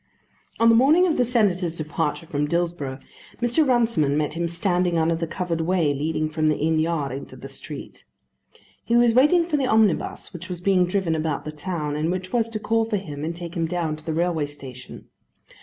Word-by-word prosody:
On 230 0 +5
the - - +6
morning 300 +9 +5
of 330 -4 +1
the 250 - +4
Senator's 195 -8 +1
departure 150 0 -2
from 150 -1 -1
Dillsborough, 170 -5 -2 0.4
Mr. 245 +6 +2
Runciman 225 - +2
met 150 -1 -1
him 170 +1 -1
standing 175 0 0
under 165 +1 +2
the 165 0 -2
covered 170 -1 -2
way 165 -3 +1
leading 155 +2 -1
from 155 0 -1
the 155 - +2
inn 160 +1 +1
yard 155 -4 -1
into 135 +2 -7
the - - -9
street. - - -10 0.8
He 235 - 0
was 240 -1 +5
waiting 300 +8 +5
for 320 -3 0
the 270 -2 0
omnibus 220 -6 +1
which 175 +2 -8
was 180 -2 -5
being 180 -1 +3
driven 180 -3 0
about 155 -2 -2
the 155 - -4
town, 150 -1 -4
and 155 +2 -1
which 185 0 -4
was 230 -2 +1
to 220 -1 -4
call 225 +1 +1
for 220 -2 -1
him 150 -7 -7
and 165 +2 -3
take 170 -1 -7
him 165 -3 -1
down 165 -2 -2
to 155 - -12
the 160 - -3
railway 165 -3 0
station. 130 -3 -11
170 Hz, 205 wpm, -23 LUFS, 155-215 Hz, 0.8 s, the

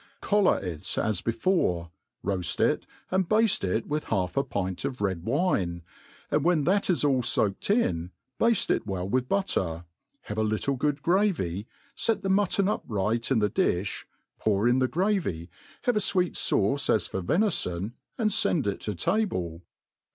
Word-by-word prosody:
COLLAR 205 -2 +3
it 85 -4 -3
as 105 -4 0
before; 110 - 0 0.3
roaft 95 -3 0
it, - - +1 0.2
and 185 -1 +1
bafte 220 0 +3
it 95 +4 0
with 150 +1 -2
half 95 -4 -1
a 140 - +2 0.2
{»int 95 -1 -5
of 130 -2 -3
red 95 -4 -1
wine, 105 - 0 0.5
and 150 - +2
when 170 -3 +3
that 195 +6 +1
is 175 - +2
all 135 -3 +3
foaked 115 - +1
in, 90 - +1 0.3
bafte 230 -3 +3
it - - 0
well 95 -2 -3
with 125 +4 0
butter, 90 - -1 0.4
have 105 +1 -5
a - - +2
little 110 +6 0
good 145 +2 -1
gravy, 165 - +1 0.3
fet 215 -3 0
the 195 - -1
mutton 195 0 +2
upright 115 - -1
in 135 - +3
the 105 -1 +3
difli, 95 +1 0 0.3
pour 105 +1 +1
in 125 +2 +3
the 130 - +2
gravy, 170 - -1 0.3
have 245 -3 +2
fweet 185 -3 +2
fauce 135 +8 +1
as 110 - +3
for 95 - -3
ventfon, 105 - 0 0.3
and 215 -4 +1
fend 175 - +3
it 100 -1 -1
to 105 - -4
table. 95 - -1
125 Hz, 165 wpm, -27 LUFS, -, 0.5 s, COLLAR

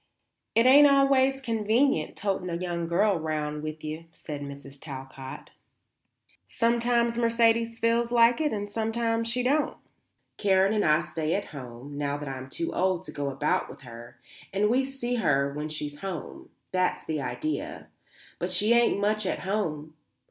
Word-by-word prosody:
"It 230 - +5
ain't 285 +3 +8
always 270 -1 +4
convenient 225 - +1
toting 195 -3 -2
a 170 - -2
young 170 -1 -3
girl 190 +2 +2
round 150 -1 -2
with 155 0 -6
you," 155 +2 -5
said 150 -3 -7
Mrs. 140 -1 -9
Talcott. 135 -1 -8 1.0
"Sometimes 235 0 +1
Mercedes 230 0 +2
feels 230 +1 +1
like 235 +2 +5
it 300 - +1
and 205 -1 -4
sometimes 225 +1 -1
she 250 +2 0
don't. 290 +4 +1 0.6
Karen 195 0 +3
and 210 - +1
I 155 +1 +3
stay 155 +1 -2
at 200 - -2
home, 135 +1 -8
now 145 0 -1
that 145 0 -7
I'm 130 -1 -6
too 165 +4 -3
old 185 -1 +1
to - - -8
go 145 -1 -3
about 135 - 0
with - - -12
her, 120 -1 -11 0.3
and 210 +2 +2
we 260 +2 +3
see 260 -2 -3
her 140 -9 +1
when 150 +1 -4
she's 150 -1 -6
home. 185 -4 -6 0.2
That's 185 -1 0
the 155 -2 -2
idea. 310 - -4 0.5
But - - -2
she 215 +3 +3
ain't 235 -3 +3
much 210 0 0
at - - -2
home. 160 -7 -2
190 Hz, 165 wpm, -27 LUFS, 150-230 Hz, 1.0 s, ain't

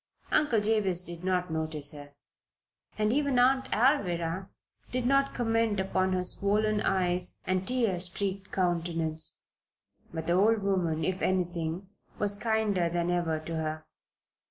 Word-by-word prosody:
Uncle 270 -7 +3
Jabez 205 -4 +1
did 175 -1 -5
not 180 -2 0
notice 155 -2 0
her, 145 -1 -11 0.8
and 215 +1 +1
even 280 -2 +1
Aunt 260 +2 +3
Alvirah 190 - +1 0.4
did 250 -1 -1
not 275 +2 +2
comment 225 -3 +1
upon 190 0 0
her 185 0 0
swollen 210 +3 +1
eyes 180 -1 0
and 185 +1 -1
tear 230 -8 +1
streaked 190 +2 -2
countenance. 165 -3 -1 0.7
But 160 -1 -5
the 170 - +1
old 210 +3 +3
woman, 175 -5 0
if 185 0 -1
anything, 175 -1 -1 0.3
was 205 -1 +4
kinder 210 -4 0
than 175 +1 -1
ever 170 -3 0
to 165 +1 -5
her. 155 0 -3
185 Hz, 135 wpm, -29 LUFS, 170-215 Hz, 0.8 s, was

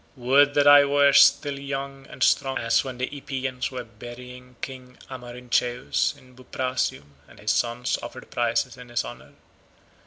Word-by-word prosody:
Would 140 +3 +3
that 145 -1 +4
I 145 0 +9
were 140 0 +4
still 140 0 +5
young 140 -1 -6
and - - -4
strong 135 -1 +2
as 115 0 +1
when 130 -2 -7
the 125 - -1
Epeans 130 -2 -4
were 125 -2 -6
burying 125 +2 -12
King 130 -1 -8
Amarynceus 125 -1 -2
in 125 0 -20
Buprasium, 125 - -3
and - - -18
his - - -1
sons 120 +1 -1
offered - - -10
prizes 120 +1 -1
in 125 -1 -12
his 120 - -1
honour. - - -11
125 Hz, 155 wpm, -24 LUFS, 120-135 Hz, -, I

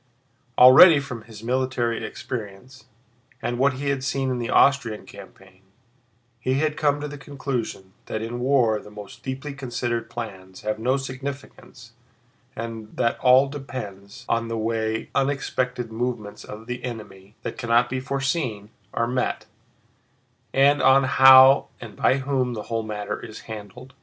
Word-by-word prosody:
Already 140 +6 +9
from 125 -5 -7
his 110 -2 -12
military 125 -2 -1
experience 115 +2 -7 0.5
and 120 +1 -3
what 135 +1 +3
he 140 +2 -3
had 135 -2 -1
seen 135 -1 -1
in 125 - -2
the 120 - -3
Austrian 125 -6 +3
campaign, 95 -1 -15 0.8
he 130 +2 0
had 150 +2 0
come 145 -1 +1
to 150 - -4
the 145 0 -9
conclusion 130 -9 -5
that 110 - -3
in 120 +2 -5
war 125 -4 +2
the 105 - -13
most 105 +4 -11
deeply 135 +3 -5
considered 120 -3 -3
plans 95 -5 -8
have 105 0 -3
no 130 +4 +1
significance 135 -3 -8 0.6
and 115 -1 -7
that 115 - 0
all 130 +2 +5
depends 130 -5 -8
on 115 0 0
the 115 0 -3
way 110 0 -2
unexpected 130 -3 -1
movements 110 -3 -4
of 105 +1 -10
the 125 +1 -6
enemy—that 105 -4 -8
cannot 120 +1 +2
be 130 +1 -3
foreseen—are 120 - -3
met, 125 +1 -2 1.1
and 140 +2 +4
on 135 +1 +5
how 130 +1 +7
and - - -10
by 130 - +2
whom 130 -2 -1
the 105 - -5
whole 115 - 0
matter 105 -2 -5
is 110 -2 -9
handled. 110 +4 -10
125 Hz, 145 wpm, -24 LUFS, 110-135 Hz, 1.1 s, Already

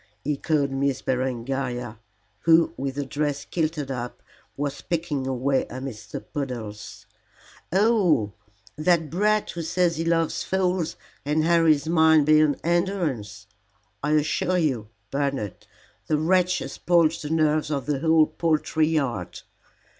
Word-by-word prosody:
echoed 145 -1 0
Miss 135 0 -1
Berengaria, 125 -2 -2 0.4
who, 165 +7 +4
with 135 0 -4
her 145 0 -2
dress 145 +1 -2
kilted 155 -4 -2
up, 125 -1 -6 0.3
was 145 0 -3
picking 160 -5 -2
her 135 - -1
way 130 +2 0
amidst 130 -3 -7
the - - -4
puddles. 115 -7 -6 0.7
"Oh, 185 - +3 0.4
that 160 -1 +1
brat 210 +4 +1
who 170 - -5
says 170 0 +1
he 165 - -1
loves 165 -1 +1
fowls 185 -3 0 0.3
and 150 +2 +1
harries 160 -3 +3
mine 160 -2 +5
beyond 155 -1 +4
endurance. 165 - -1 0.6
I 150 +2 0
assure 155 +4 +1
you, 130 -11 0 0.2
Bernard, 135 -8 -3 0.4
the 155 - +2
wretch 180 +3 +2
has - - -5
spoilt 170 -2 +2
the 150 - -5
nerves 155 -1 +1
of 140 -4 -2
the 145 -1 -1
whole 160 0 +4
poultry 155 -1 0
yard. 135 - -2
150 Hz, 130 wpm, -25 LUFS, 135-165 Hz, 0.7 s, mine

